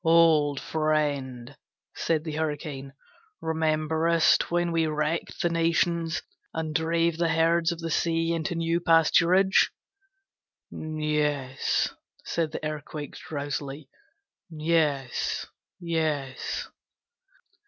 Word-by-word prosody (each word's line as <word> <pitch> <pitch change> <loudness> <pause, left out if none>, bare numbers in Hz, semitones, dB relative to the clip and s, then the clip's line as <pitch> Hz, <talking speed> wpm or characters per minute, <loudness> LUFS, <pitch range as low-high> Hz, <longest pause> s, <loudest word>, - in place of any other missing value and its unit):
'Old 160 -4 +4
friend,' 145 -5 -1 0.4
said 160 -2 0
the 160 - -4
Hurricane, 145 -3 -3 0.5
'rememberest 160 +1 +2
when 175 0 +1
we 165 -1 +2
wrecked 150 +2 -2
the 175 - +3
nations 165 0 +1 0.3
and 160 -1 -2
drave 165 0 +1
the 170 - +3
herds 165 +1 +3
of 170 - -4
the 165 0 -3
sea 165 +1 +1
into 165 +2 -2
new 165 +1 +1
pasturage?' 170 +3 +4 1.0
'Yes,' 150 -3 -1 0.3
said 165 -2 -1
the 155 - -5
Earthquake, 150 -1 -5
drowsily; 145 -2 -5 0.6
'Yes, 155 -5 0 0.3
yes.' 155 -6 -2
160 Hz, 95 wpm, -27 LUFS, 150-165 Hz, 1.0 s, Old